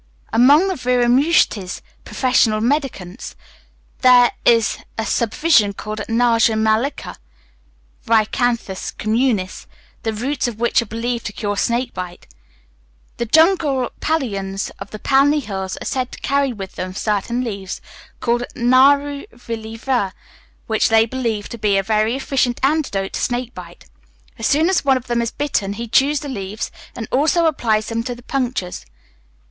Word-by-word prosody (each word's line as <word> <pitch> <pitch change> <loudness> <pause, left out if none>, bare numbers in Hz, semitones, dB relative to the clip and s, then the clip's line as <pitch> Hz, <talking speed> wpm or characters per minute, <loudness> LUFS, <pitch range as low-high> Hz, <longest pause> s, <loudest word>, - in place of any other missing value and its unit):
Among 280 +10 +6
the 380 - 0
Viramushtis 250 - +2 0.3
(professional 250 -4 +2
mendicants), 240 - -2 0.6
there 250 -1 +6
is 230 -2 +3 0.2
a 225 - -1
subdivision 230 -2 +2
called 215 +2 -6
Naga 230 -1 +3
Mallika 220 +5 0 0.9
(Rhinacanthus 225 -2 0
communis), 215 -4 -1 0.3
the 225 - -1
roots 255 +5 -2
of 230 -2 -6
which 235 +2 +2
are 235 - -7
believed 235 +2 -3
to 210 - -7
cure 205 -1 -3
snake 240 +4 -1
bite. 180 -1 -7 0.9
The 235 - -2
jungle 315 - +3
Paliyans 200 -11 -2
of - - -8
the 215 - -7
Palni 275 +5 +3
hills 190 -7 -5
are - - -8
said 255 -1 -2
to - - -9
carry 280 -1 +1
with 195 -5 -8
them 185 0 -5
certain 215 +4 -1
leaves, 200 -5 -5 0.4
called 240 0 0
naru 280 +4 +3
valli 225 -1 -7
ver, 230 -6 -1 0.5
which 220 -1 +1
they 225 0 +5
believe 230 -4 -3
to 235 - -8
be 205 -2 +2
a 195 - +1
very 215 +3 +1
efficient 265 -2 0
antidote 270 -10 0
to - - -3
snake 245 0 -2
bite. - - -11 0.5
As 225 - 0
soon 310 +3 +3
as 375 -1 +2
one 270 -2 +3
of 255 - -8
them 240 -1 0
is 235 - -1
bitten, 230 -8 -2
he 235 +3 -6
chews 275 +5 +2
the 290 - -6
leaves, 210 -4 -5 0.2
and 230 -3 -5
also 320 +5 +2
applies 225 -9 +1
them 230 0 -1
to 245 -1 -3
the 240 - -15
punctures. 245 -9 -3
235 Hz, 150 wpm, -19 LUFS, 215-265 Hz, 0.9 s, Among